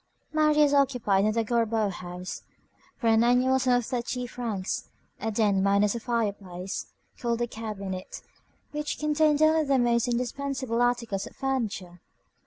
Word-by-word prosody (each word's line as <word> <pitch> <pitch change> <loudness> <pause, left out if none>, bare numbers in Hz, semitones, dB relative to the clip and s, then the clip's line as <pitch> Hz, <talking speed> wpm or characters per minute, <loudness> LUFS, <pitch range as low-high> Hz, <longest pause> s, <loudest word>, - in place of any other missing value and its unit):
Marius 300 -2 +4
occupied 235 -8 +3
in 215 - +3
the 230 0 +1
Gorbeau 225 -2 +1
house, 180 0 -7 0.6
for 245 - -6
an 225 0 +5
annual 250 +2 +3
sum 255 -1 +2
of 245 -2 +1
thirty 250 +1 -3
francs, 230 -6 -4 0.3
a 225 - -2
den 205 -3 +2
minus 200 +1 +3
a 235 - -3
fireplace, 200 -6 -3 0.3
called 235 -1 -1
a 240 - +1
cabinet, 200 -5 -6 0.5
which 300 0 -3
contained 300 0 +2
only 315 0 +4
the 275 -2 +2
most 240 -1 +2
indispensable 250 0 -1
articles 235 -5 0
of - - -14
furniture. 210 -10 -3
235 Hz, 145 wpm, -27 LUFS, 205-260 Hz, 0.6 s, an